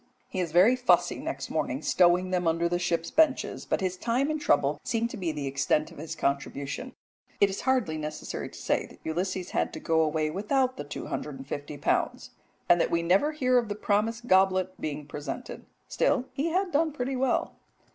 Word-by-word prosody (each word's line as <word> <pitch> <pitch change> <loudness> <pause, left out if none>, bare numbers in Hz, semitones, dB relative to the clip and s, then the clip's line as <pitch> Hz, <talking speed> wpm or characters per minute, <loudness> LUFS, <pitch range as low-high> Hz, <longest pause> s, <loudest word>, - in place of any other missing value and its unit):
He 190 - -4
is 175 -3 -1
very 185 +9 +6
fussy 250 -1 +2
next - - -5
morning - - -2
stowing 180 +1 +3
them 180 -2 +1
under 165 +1 +2
the 175 +1 0
ship's 170 -1 -1
benches, 310 -3 +2
but - - 0
his 185 -1 -1
time 250 +9 0
and 310 -1 -3
trouble 145 - +2
seem 230 -1 0
to - - -7
be 175 -4 -2
the 150 -2 -4
extent 140 +3 0
of - - -12
his 160 +1 -5
contribution. 140 - -3 0.4
It 200 -1 +4
is 190 - -4
hardly 205 -13 +1
necessary 150 0 -5
to - - -13
say - - 0
that - - -17
Ulysses 180 +3 -2
had - - 0
to - - -6
go 160 -1 +2
away 155 0 0
without 255 - 0
the - - -4
250 145 0 -6
pounds, 145 - -1 0.4
and 175 -1 +5
that - - +1
we 170 0 +1
never 190 - +3
hear 255 -4 +3
of 230 -3 -4
the 205 - -2
promised 220 +3 0
goblet 185 -2 +3
being 150 -1 -4
presented. 145 - -7 0.2
Still 270 -3 +1
he 280 +5 -1
had 365 +2 0
done 315 +1 +2
pretty 265 -1 -2
well. 260 0 0
185 Hz, 195 wpm, -28 LUFS, 155-250 Hz, 0.4 s, very